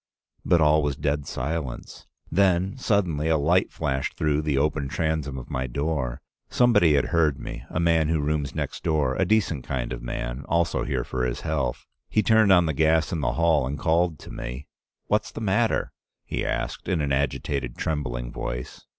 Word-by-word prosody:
But 85 - +3
all 75 0 +5
was 75 -2 -1
dead 75 0 -1
silence. 70 -1 -4 0.2
Then 95 +2 +2
suddenly 95 - 0
a 80 - +4
light 85 +5 +2
flashed 65 -4 -2
through 75 -1 +1
the 75 -3 0
open 75 0 +1
transom 80 -2 -2
of 65 - -8
my 65 0 -2
door. 70 -2 -2 0.3
Somebody 115 -11 +4
had 70 - +1
heard 80 -5 +3
me - - -7
— - - -28
a - - -2
man 85 -2 +3
who 80 0 +1
rooms 75 -1 -1
next - - -3
door, 75 -5 +1
a 95 - +1
decent 90 - +1
kind 65 -2 -3
of - - -6
man, - - -4
also 85 0 +1
here - - -1
for 65 -1 -3
his 60 -1 -2
health. 70 -4 -2 0.2
He 110 - +2
turned 110 -1 +5
on 90 -2 +6
the 80 - 0
gas 80 +2 +2
in 80 - -2
the - - 0
hall 80 -5 +2
and 70 +2 -3
called 85 0 +1
to - - -11
me. 65 +3 -6 0.4
'What's 105 +1 0
the - - -7
matter?' 110 +2 +1 0.3
he - - -3
asked, - - -3
in 90 - +1
an 70 -2 -1
agitated, 70 -2 -1
trembling - - -3
voice. 60 +1 -6
75 Hz, 190 wpm, -25 LUFS, 70-85 Hz, 0.4 s, on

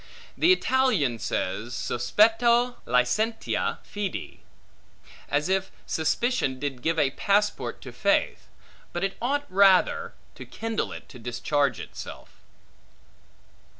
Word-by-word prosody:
The 345 - +4
Italian 250 - +2
says, 110 +2 -3
Sospetto 235 - +2
licentia 125 - 0
fede; 205 -2 -5 0.9
as 145 +2 +1
if 190 0 0 0.2
suspicion, 160 - 0
did 135 -2 -4
give 165 +3 0
a 145 -3 +2
passport 205 +7 0
to - - -9
faith; - - 0 0.5
but 175 - -2
it 195 0 -1
ought, 285 +4 0
rather, 195 - +3 0.2
to - - -10
kindle 225 -1 -3
it - - -9
to 125 - -12
discharge 125 +2 0
itself. - - -9
190 Hz, 110 wpm, -26 LUFS, -, 0.9 s, The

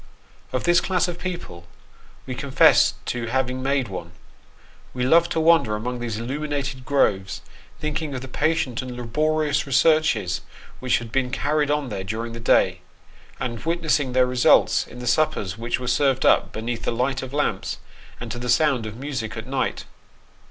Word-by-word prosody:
Of 130 - -2
this 175 0 +4
class 180 -2 +1
of 175 -1 -5
people 170 - -6 0.6
we 130 - -5
confess 140 0 +4
to 120 -1 -3
having 130 +1 -1
made 135 -1 0
one. 90 -4 -7 0.8
We 125 - -1
loved 170 +5 +4
to - - 0
wander 160 -9 +4
among 120 +3 -4
these 115 -3 -3
illuminated 135 +1 -3
groves, 95 -9 +1 0.4
thinking 155 -1 -3
of 130 - -4
the 130 - -7
patient 135 -3 0
and 125 -1 -7
laborious 150 +4 0
researches 135 - +2 0.4
which 130 -1 +2
had 115 -1 -7
been 130 0 0
carried 145 +3 0
on 145 -3 0
there 100 -3 -4
during 115 +4 -4
the 115 - -7
day, 115 - +2 0.6
and 120 -2 -4
witnessing 160 -5 0
their 130 0 +4
results 125 -1 +3
in - - -12
the 125 - -7
suppers 110 -8 0
which 115 +2 -2
were 125 - -5
served 130 +1 +2
up - - +4
beneath 115 +1 -4
the - - -1
light 130 +3 -1
of 130 - -7
lamps 145 +1 -1 0.4
and - - -6
to 120 - -5
the 125 0 -4
sound 125 -3 +2
of 110 - -7
music 130 -6 -4
at 110 - -5
night. 135 +1 -2
130 Hz, 175 wpm, -23 LUFS, 115-150 Hz, 0.8 s, this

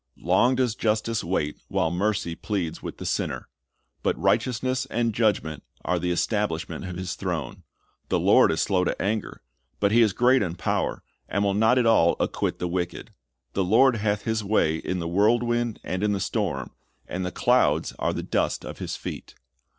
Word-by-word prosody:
Long 105 +9 +3
does 125 -3 +1
justice 110 0 0
wait 75 -4 -1
while 80 - 0
mercy 100 -1 0
pleads 90 -3 -3
with - - -7
the - - -7
sinner. - - -2 0.5
But - - 0
"righteousness 130 +1 +1
and 115 -1 0
judgment 105 -8 0 0.2
are 90 +1 +1
the 90 - -1
establishment 90 -1 -1
of 90 -1 -6
His 90 -1 -4
throne."^ - - -4 0.5
"The - - +2
Lord - - +5
is 80 - +1
slow 95 -3 +1
to - - -2
anger;" 105 +1 -2 0.4
but 100 -1 +2
He 120 +2 +5
is 110 -4 +4
"great 125 +4 +4
in 90 -4 -2
power, 90 - -1 0.3
and 100 - 0
will 100 -1 +2
not 110 +5 +4
at 125 - +3
all 110 -7 +4
acquit - - -1
the 90 - -2
wicked: 90 0 -3 0.4
the 95 - +1
Lord 115 +6 +4
hath 105 -1 -1
His 110 -1 -1
way 95 -6 +2
in 90 +3 -3
the 85 -2 -3
whirlwind 120 +5 +1
and 95 +1 -3
in 105 0 +2
the 100 - -1
storm, 95 - -2 0.4
and 95 +1 -3
the 90 - -3
clouds 80 -11 +2
are - - +1
the - - -4
dust - - -1
of - - -8
His - - -4
feet."'' - - -7
100 Hz, 185 wpm, -25 LUFS, 90-115 Hz, 0.5 s, Lord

